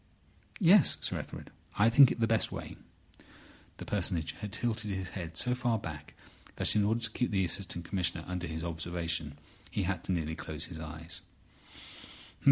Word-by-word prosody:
"Yes, 195 Hz, +1 st, +7 dB
Sir -, -, 0 dB
Ethelred. -, -, -8 dB, 0.3 s
I 105 Hz, -, +5 dB
think 135 Hz, +1 st, +8 dB
it -, -, -3 dB
the 115 Hz, -, +4 dB
best 115 Hz, -1 st, +1 dB
way." -, -, -6 dB, 1.0 s
The -, -, -7 dB
Personage 90 Hz, -5 st, 0 dB
had 105 Hz, -, -7 dB
tilted 110 Hz, -1 st, -2 dB
his 95 Hz, -2 st, -3 dB
head 85 Hz, -4 st, -6 dB
so 125 Hz, -, +3 dB
far 125 Hz, -2 st, +1 dB
back 75 Hz, -8 st, -8 dB, 0.4 s
that, -, -, +1 dB
in 105 Hz, -, +4 dB
order 110 Hz, +3 st, +1 dB
to 115 Hz, -1 st, -1 dB
keep 125 Hz, -, 0 dB
the 95 Hz, -3 st, +2 dB
Assistant 85 Hz, -1 st, -2 dB
Commissioner 85 Hz, -3 st, 0 dB
under 90 Hz, -1 st, -3 dB
his 80 Hz, +1 st, -4 dB
observation, 85 Hz, -2 st, -2 dB, 0.3 s
he 100 Hz, -, -1 dB
had 90 Hz, -2 st, -2 dB
to -, -, -2 dB
nearly 80 Hz, -3 st, -1 dB
close 80 Hz, 0 st, -3 dB
his 85 Hz, -2 st, -6 dB
eyes. 80 Hz, +1 st, -4 dB
90 Hz, 175 wpm, -31 LUFS, 80-110 Hz, 1.0 s, think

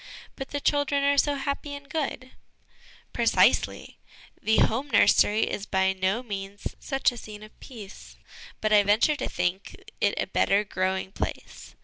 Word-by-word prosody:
' -, -, -20 dB
But 270 Hz, -, -7 dB
the 285 Hz, -, -3 dB
children 285 Hz, 0 st, +1 dB
are 285 Hz, 0 st, +3 dB
so 290 Hz, 0 st, +2 dB
happy 280 Hz, +1 st, -4 dB
and 285 Hz, 0 st, -11 dB
good! 270 Hz, -4 st, -4 dB, 0.4 s
' -, -, -26 dB
Precisely; -, -, +2 dB, 0.4 s
the 220 Hz, -, +2 dB
home 260 Hz, +6 st, +1 dB
nursery 210 Hz, -2 st, +4 dB
is 205 Hz, -, -3 dB
by 190 Hz, 0 st, +1 dB
no 190 Hz, +5 st, -1 dB
means 200 Hz, -3 st, -6 dB
such 270 Hz, -2 st, 0 dB
a 245 Hz, -, -10 dB
scene 215 Hz, -2 st, -10 dB
of 215 Hz, -, -16 dB
peace, 215 Hz, -6 st, -11 dB, 0.5 s
but 215 Hz, 0 st, +1 dB
I 210 Hz, -, +7 dB
venture 210 Hz, +9 st, +3 dB
to -, -, -3 dB
think 185 Hz, +2 st, -2 dB, 0.3 s
it -, -, +2 dB
a -, -, 0 dB
better 200 Hz, +1 st, +2 dB
growing 190 Hz, -1 st, -2 dB
place. -, -, -6 dB
220 Hz, 165 wpm, -26 LUFS, 200-280 Hz, 0.5 s, I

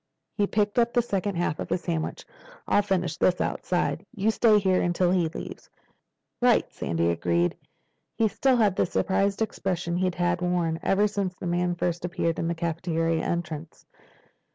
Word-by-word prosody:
He 205 Hz, -2 st, +1 dB
picked 210 Hz, +2 st, +1 dB
up 235 Hz, 0 st, +2 dB
the 240 Hz, -, +3 dB
second 200 Hz, -3 st, -2 dB
half 170 Hz, -3 st, -1 dB
of -, -, -4 dB
his 180 Hz, -, 0 dB
sandwich. 165 Hz, -3 st, -3 dB, 0.4 s
"I'll -, -, +4 dB
finish 180 Hz, -5 st, -1 dB
this 180 Hz, -1 st, +2 dB
outside. -, -, -1 dB
You 210 Hz, +2 st, +2 dB
stay 220 Hz, -1 st, +4 dB
here 190 Hz, -2 st, +2 dB
until 175 Hz, 0 st, +1 dB
he 175 Hz, -3 st, +2 dB
leaves." -, -, -8 dB, 0.7 s
"Right," -, -, +4 dB
Sandy 85 Hz, 0 st, 0 dB
agreed. 85 Hz, +1 st, +1 dB, 0.6 s
He 225 Hz, -, +3 dB
still 260 Hz, +5 st, +2 dB
had 210 Hz, -5 st, +3 dB
the -, -, +2 dB
surprised 195 Hz, +3 st, +1 dB
expression 180 Hz, -5 st, -2 dB
he 185 Hz, 0 st, +2 dB
had 175 Hz, 0 st, 0 dB
worn 175 Hz, -2 st, 0 dB
ever 195 Hz, +2 st, +3 dB
since 200 Hz, -3 st, -2 dB
the 185 Hz, -, -8 dB
man 175 Hz, 0 st, 0 dB
first 175 Hz, -1 st, -2 dB
appeared 175 Hz, -2 st, -1 dB
at 165 Hz, -, -1 dB
the 170 Hz, -, -1 dB
cafeteria 165 Hz, -1 st, -1 dB
entrance. 165 Hz, -2 st, -4 dB
180 Hz, 170 wpm, -26 LUFS, 170-200 Hz, 0.7 s, I'll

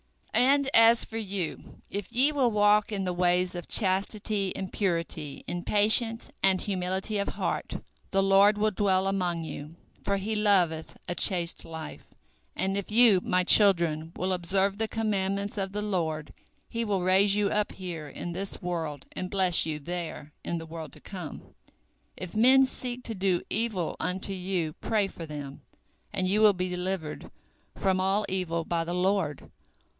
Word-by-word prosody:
And 275 Hz, +3 st, +3 dB
as 230 Hz, +1 st, +6 dB
for 225 Hz, -, -7 dB
you, 195 Hz, -5 st, -5 dB
if 200 Hz, -1 st, -4 dB
ye 265 Hz, +5 st, +4 dB
will 275 Hz, -5 st, +2 dB
walk 210 Hz, 0 st, +3 dB
in 200 Hz, -2 st, -2 dB
the 180 Hz, -1 st, -2 dB
ways 180 Hz, 0 st, +1 dB
of 175 Hz, -1 st, -7 dB
chastity 200 Hz, 0 st, +2 dB
and 190 Hz, -1 st, -6 dB
purity 165 Hz, -6 st, -2 dB
in 175 Hz, -, -3 dB
patience 220 Hz, +4 st, +3 dB
and 190 Hz, -1 st, +3 dB
humility 190 Hz, +2 st, -2 dB
of 200 Hz, -, -1 dB
heart, -, -, -3 dB, 0.3 s
the 195 Hz, 0 st, +1 dB
Lord 195 Hz, +2 st, +5 dB
will 215 Hz, +1 st, +1 dB
dwell 190 Hz, -1 st, +1 dB
among 180 Hz, -4 st, -1 dB
you, 150 Hz, +1 st, -8 dB, 0.3 s
for 200 Hz, -, 0 dB
He 205 Hz, +3 st, -3 dB
loveth 185 Hz, -7 st, +1 dB
a -, -, -1 dB
chaste 175 Hz, -2 st, +2 dB
life, 160 Hz, -1 st, -8 dB, 0.5 s
and 195 Hz, +1 st, -1 dB
if 200 Hz, +1 st, -4 dB
you, 220 Hz, -4 st, +6 dB
my 180 Hz, +1 st, +1 dB
children, 170 Hz, -6 st, +4 dB
will 185 Hz, +1 st, -1 dB
observe 190 Hz, +3 st, 0 dB
the 220 Hz, +1 st, -1 dB
commandments 200 Hz, -2 st, -2 dB
of 195 Hz, -1 st, -2 dB
the 210 Hz, +1 st, -3 dB
Lord, 160 Hz, -7 st, -2 dB, 0.3 s
He 230 Hz, 0 st, -3 dB
will 200 Hz, -4 st, -1 dB
raise 195 Hz, +2 st, +4 dB
you 205 Hz, -1 st, +1 dB
up 210 Hz, 0 st, 0 dB
here, 170 Hz, -5 st, -7 dB
in 175 Hz, +5 st, -6 dB
this 195 Hz, +3 st, -2 dB
world, 165 Hz, -5 st, -4 dB
and 185 Hz, -, -5 dB
bless 185 Hz, -3 st, +2 dB
you 155 Hz, -1 st, -3 dB
there, 165 Hz, -2 st, -6 dB
in 170 Hz, -, -3 dB
the 165 Hz, -, -7 dB
world 160 Hz, -1 st, -8 dB
to -, -, -13 dB
come. 180 Hz, -7 st, -9 dB, 0.6 s
If 185 Hz, 0 st, -8 dB
men 260 Hz, +4 st, +6 dB
seek 250 Hz, -1 st, -2 dB
to 230 Hz, -, -4 dB
do 190 Hz, -2 st, 0 dB
evil 210 Hz, -6 st, -2 dB
unto 190 Hz, +2 st, -2 dB
you, 180 Hz, -4 st, -2 dB
pray 210 Hz, +2 st, -1 dB
for 170 Hz, -3 st, -9 dB
them, 145 Hz, -2 st, -8 dB, 0.5 s
and 185 Hz, -, -1 dB
you 205 Hz, +3 st, +2 dB
will 210 Hz, -1 st, +6 dB
be 185 Hz, 0 st, -3 dB
delivered 180 Hz, -3 st, -4 dB, 0.5 s
from 190 Hz, -1 st, +1 dB
all 195 Hz, +3 st, +1 dB
evil 170 Hz, -3 st, -2 dB
by 170 Hz, -1 st, -1 dB
the 175 Hz, +1 st, -4 dB
Lord. 185 Hz, -5 st, -1 dB
190 Hz, 170 wpm, -27 LUFS, 175-205 Hz, 0.6 s, as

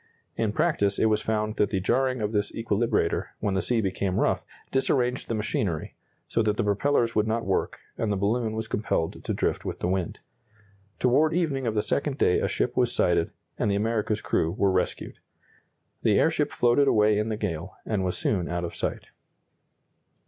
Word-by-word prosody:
In 110 Hz, -2 st, 0 dB
practice 105 Hz, -7 st, +1 dB
it -, -, +2 dB
was 105 Hz, 0 st, +2 dB
found 110 Hz, 0 st, -1 dB
that 105 Hz, -, +2 dB
the 95 Hz, -, 0 dB
jarring 130 Hz, +5 st, +1 dB
of 105 Hz, 0 st, -1 dB
this 105 Hz, -2 st, 0 dB
equilibrator, 115 Hz, -4 st, 0 dB
when 100 Hz, -, -1 dB
the 95 Hz, -, +1 dB
sea 120 Hz, -2 st, +1 dB
became 95 Hz, -1 st, -1 dB
rough, -, -, +1 dB, 0.3 s
disarranged 125 Hz, -1 st, +1 dB
the 115 Hz, -, -1 dB
machinery, 100 Hz, -6 st, -2 dB, 0.3 s
so 115 Hz, -, +1 dB
that 105 Hz, -1 st, +1 dB
the -, -, +1 dB
propellers 115 Hz, +3 st, +1 dB
would 105 Hz, 0 st, +1 dB
not 115 Hz, +1 st, -1 dB
work, 95 Hz, -, -1 dB, 0.2 s
and 110 Hz, -, 0 dB
the 100 Hz, -, 0 dB
balloon 110 Hz, +3 st, 0 dB
was 110 Hz, 0 st, -3 dB
compelled 105 Hz, -6 st, -2 dB
to -, -, -2 dB
drift -, -, -1 dB
with -, -, -4 dB
the -, -, -1 dB
wind. 90 Hz, -2 st, -1 dB, 0.8 s
Toward 150 Hz, +6 st, +3 dB
evening 140 Hz, -8 st, 0 dB
of 110 Hz, -, -1 dB
the 105 Hz, -, +2 dB
second 140 Hz, -1 st, -1 dB
day 90 Hz, -, +3 dB
a -, -, 0 dB
ship -, -, -1 dB
was -, -, +2 dB
sighted, -, -, +2 dB, 0.3 s
and -, -, +1 dB
the 100 Hz, -, +1 dB
America's 105 Hz, 0 st, 0 dB
crew 80 Hz, -, +1 dB
were 100 Hz, +1 st, +1 dB
rescued. 95 Hz, -1 st, -2 dB, 0.8 s
The -, -, +3 dB
airship -, -, +2 dB
floated 125 Hz, +4 st, +3 dB
away 105 Hz, -3 st, +4 dB
in 105 Hz, +1 st, -1 dB
the 110 Hz, -, -2 dB
gale, 90 Hz, -3 st, -4 dB
and 105 Hz, -4 st, -1 dB
was 90 Hz, -1 st, -1 dB
soon 90 Hz, -5 st, 0 dB
out 85 Hz, 0 st, -2 dB
of 85 Hz, -, -7 dB
sight. -, -, -3 dB
105 Hz, 190 wpm, -26 LUFS, 100-120 Hz, 0.8 s, away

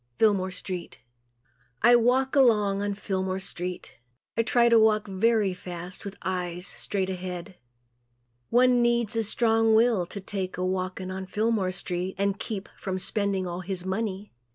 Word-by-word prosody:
Fillmore 200 Hz, -4 st, +3 dB
Street 185 Hz, -1 st, -6 dB, 0.8 s
I 240 Hz, +1 st, +8 dB
walk 255 Hz, +4 st, +3 dB
along 210 Hz, -7 st, +4 dB
on 205 Hz, 0 st, -1 dB
Fillmore 190 Hz, -2 st, -2 dB
street. 180 Hz, -5 st, -6 dB, 0.4 s
I -, -, +3 dB
try 235 Hz, +1 st, +3 dB
to 230 Hz, -1 st, +6 dB
walk 215 Hz, -1 st, +3 dB
very 205 Hz, 0 st, +2 dB
fast 180 Hz, +1 st, -8 dB
with 200 Hz, 0 st, -7 dB
eyes 180 Hz, -1 st, -3 dB
straight 190 Hz, -2 st, -3 dB
ahead. 180 Hz, 0 st, -6 dB, 0.9 s
One 250 Hz, 0 st, +4 dB
needs 235 Hz, -1 st, +2 dB
a 225 Hz, -, +1 dB
strong 225 Hz, 0 st, +3 dB
will 220 Hz, -6 st, +3 dB
to 200 Hz, -, -6 dB
take 190 Hz, -1 st, -4 dB
a 180 Hz, -, -1 dB
walking 185 Hz, 0 st, -2 dB
on 190 Hz, 0 st, -5 dB
Fillmore 215 Hz, -1 st, 0 dB
street 180 Hz, 0 st, -4 dB
and 200 Hz, 0 st, 0 dB
keep 205 Hz, -3 st, -5 dB
from 190 Hz, -1 st, -4 dB
spending 200 Hz, -1 st, -1 dB
all 175 Hz, 0 st, -4 dB
his 185 Hz, -1 st, -4 dB
money. 200 Hz, +1 st, -3 dB
195 Hz, 155 wpm, -27 LUFS, 185-225 Hz, 0.9 s, I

